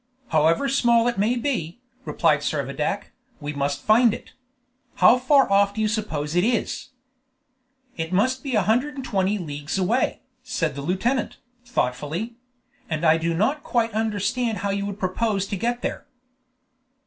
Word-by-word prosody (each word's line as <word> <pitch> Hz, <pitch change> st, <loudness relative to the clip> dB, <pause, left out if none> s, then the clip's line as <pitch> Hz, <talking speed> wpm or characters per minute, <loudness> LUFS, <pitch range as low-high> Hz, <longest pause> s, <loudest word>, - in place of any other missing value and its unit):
"However 160 Hz, -, +3 dB
small 240 Hz, -3 st, +3 dB
it 240 Hz, -4 st, -1 dB
may 220 Hz, +5 st, +2 dB
be," 240 Hz, -, -2 dB, 0.3 s
replied -, -, +2 dB
Servadac, -, -, -2 dB, 0.3 s
"we 145 Hz, -1 st, -5 dB
must 140 Hz, 0 st, -2 dB
find 225 Hz, +1 st, +5 dB
it. -, -, -13 dB, 0.6 s
How 250 Hz, -, +6 dB
far 270 Hz, +2 st, +4 dB
off 200 Hz, 0 st, +3 dB
do 220 Hz, -, -2 dB
you 215 Hz, -, +2 dB
suppose 170 Hz, -9 st, -2 dB
it 175 Hz, -, +3 dB
is?" 235 Hz, +1 st, -1 dB, 1.1 s
"It 160 Hz, +1 st, -3 dB
must 255 Hz, +8 st, +1 dB
be 270 Hz, -3 st, -2 dB
a 210 Hz, -, +3 dB
hundred 250 Hz, +9 st, +1 dB
and 270 Hz, -2 st, -6 dB
twenty 200 Hz, -2 st, 0 dB
leagues 150 Hz, -3 st, -4 dB
away," 205 Hz, +7 st, 0 dB, 0.2 s
said 165 Hz, -, -2 dB
the 140 Hz, -, -6 dB
lieutenant, 190 Hz, -, -1 dB, 0.3 s
thoughtfully; 155 Hz, -, -2 dB, 0.6 s
"and 155 Hz, 0 st, -1 dB
I 160 Hz, 0 st, +5 dB
do 165 Hz, 0 st, -1 dB
not 265 Hz, -, +1 dB
quite 230 Hz, -4 st, 0 dB
understand 220 Hz, +2 st, -1 dB
how 200 Hz, -, +1 dB
you 200 Hz, 0 st, -2 dB
would 200 Hz, -1 st, -5 dB
propose 195 Hz, +1 st, -1 dB
to 200 Hz, -, -4 dB
get 240 Hz, +5 st, -2 dB
there." -, -, -4 dB
205 Hz, 160 wpm, -24 LUFS, 170-240 Hz, 1.1 s, How